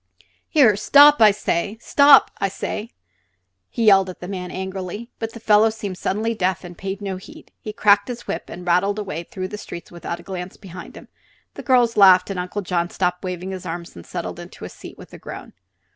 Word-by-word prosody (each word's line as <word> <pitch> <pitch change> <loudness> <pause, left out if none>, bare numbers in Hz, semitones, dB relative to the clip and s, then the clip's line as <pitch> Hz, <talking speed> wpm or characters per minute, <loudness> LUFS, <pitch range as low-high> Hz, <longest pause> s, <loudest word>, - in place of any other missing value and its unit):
"Here 260 - +5
stop! 285 +6 +6 0.6
Stop, 280 +3 +6
I 195 - 0
say!" 210 +3 -5 0.8
he 230 - -2
yelled 195 -2 +5
at 185 - -9
the 180 - -8
man, 180 -2 -5
angrily. 190 +4 -6
But 225 0 -5
the 230 - -9
fellow 215 0 +4
seemed 205 -4 -6
suddenly 220 +4 -1
deaf, 185 -4 -1
and 175 -1 -10
paid 195 +3 -6
no 190 -2 -4
heed. 310 +12 -14
He 215 - -6
cracked 205 -1 +3
his 245 -1 -7
whip - - -4
and 180 +1 -9
rattled 180 +4 +1
away 190 -6 -4
through 185 -5 -6
the 210 - -7
streets 170 - -9
without 170 0 -6
a - - -13
glance 180 -1 -7
behind 180 -2 -11
him. - - -13 0.5
The - - -8
girls 245 -4 +2
laughed 190 -1 +6
and 190 - -4
Uncle 180 +3 -4
John 175 -1 -1
stopped 180 0 -2
waving 180 0 -5
his 185 -1 -7
arms 170 +1 -7
and 85 - -10
settled - - -6
into - - -11
his - - -8
seat - - -12
with - - -14
a - - -10
groan. - - -10
195 Hz, 205 wpm, -21 LUFS, 180-220 Hz, 0.8 s, stop